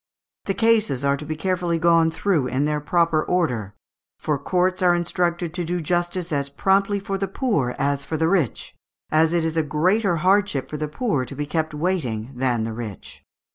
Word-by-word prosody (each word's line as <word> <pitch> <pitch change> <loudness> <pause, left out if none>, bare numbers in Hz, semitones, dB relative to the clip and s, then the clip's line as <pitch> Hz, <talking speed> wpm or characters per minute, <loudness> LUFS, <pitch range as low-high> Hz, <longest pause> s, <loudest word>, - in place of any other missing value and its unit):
The 195 - -1
cases 220 - +2
are 140 0 +3
to 145 +2 -8
be 155 - -3
carefully 175 0 -1
gone 165 0 +4
through 160 -4 0
in 130 +3 0
their 150 0 -1
proper 165 0 +2
order; 125 - -1 0.4
for 150 -3 -1
courts 185 +5 0
are 175 -1 +4
instructed 175 -1 -1
to 175 -1 -2
do 175 +2 -2
justice 175 +1 -1
as 140 -2 -1
promptly 195 +6 +1
for 195 0 -4
the 195 - -1
poor 190 - -1
as 140 0 0
for 160 - -3
the 160 +1 +1
rich, 165 - 0 0.4
as 155 +1 +4
it 170 -1 +1
is 160 0 -2
a - - +4
greater 175 +6 +1
hardship 185 -4 +1
for 150 - -3
the 150 0 -2
poor 155 - -1
to 135 - -9
be 145 +2 -3
kept 155 0 -2
waiting 140 -9 -2
than 125 -3 0
the 110 0 -3
rich." 110 -4 -8
160 Hz, 195 wpm, -23 LUFS, 140-180 Hz, 0.4 s, gone